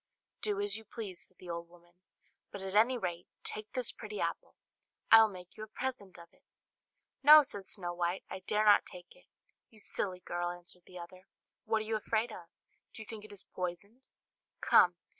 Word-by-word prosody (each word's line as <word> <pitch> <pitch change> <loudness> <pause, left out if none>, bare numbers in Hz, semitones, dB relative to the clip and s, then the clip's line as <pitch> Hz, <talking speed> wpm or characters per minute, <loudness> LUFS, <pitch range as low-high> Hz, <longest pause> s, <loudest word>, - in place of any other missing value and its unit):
"Do 205 -3 0
as 205 0 +1
you 220 - -10
please," 210 -5 -6
said 185 - -29
the 180 -1 -8
old 170 0 -6
woman, 175 0 -21 0.6
"but 200 - -7
at 190 0 -5
any 230 +5 +4
rate 175 -5 -4 0.2
take 215 0 -2
this 255 -3 0
pretty 210 -2 -7
apple; - - -3 0.6
I 225 - +11
will 220 - +5
make 180 -2 -11
you - - -10
a - - -7
present 220 -5 -5
of 170 -1 -14
it." - - -28 0.8
"No," 300 +2 +10
said 200 -7 -6
Snow 175 -4 -2
White, 175 +1 -1
"I - - -6
dare 210 +3 0
not 210 - +7
take 180 - -11
it." - - -23 0.4
"You 225 - -20
silly 185 -3 -2
girl!" 175 0 -2
answered 175 0 -5
the 180 - -11
other, 185 +2 -11 0.4
"what 220 -1 +1
are - - -10
you 220 0 0
afraid 220 +2 -1
of? 175 -5 -10 0.5
Do 220 - -7
you - - -16
think 215 -1 -8
it 215 - -12
is 200 -2 -9
poisoned? 200 +8 -6 0.5
Come! - - +5
200 Hz, 200 wpm, -33 LUFS, 180-220 Hz, 0.8 s, I